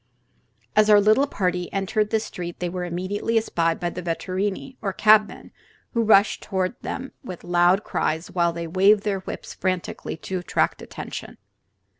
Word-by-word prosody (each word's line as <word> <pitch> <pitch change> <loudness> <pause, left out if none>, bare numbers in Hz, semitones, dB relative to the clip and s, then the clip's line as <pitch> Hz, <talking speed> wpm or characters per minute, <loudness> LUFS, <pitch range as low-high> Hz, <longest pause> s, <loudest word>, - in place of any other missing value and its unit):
As 215 0 +5
our 210 -1 +8
little 215 +7 +4
party 180 -7 -2
entered 210 +2 0
this 220 0 0
street 175 -1 -6
they 180 - -2
were 180 0 -4
immediately 185 +6 -1
espied 165 -7 0
by 175 -1 -2
the 180 - -6
vetturini, 190 +8 -3
or 195 -3 -2
cabmen, 215 +1 +3 0.4
who 235 - +2
rushed 215 -2 +4
toward 190 -1 -1
them 265 0 -5
with 185 -9 -8
loud 175 +3 +3
cries 160 +3 -2
while 170 -2 +2
they 170 0 -5
waved 195 +5 +4
their 200 -2 -1
whips 190 - -7
frantically 185 -3 -3
to 185 +3 -4
attract 175 - 0
attention. - - -8
190 Hz, 160 wpm, -24 LUFS, 175-210 Hz, 0.4 s, our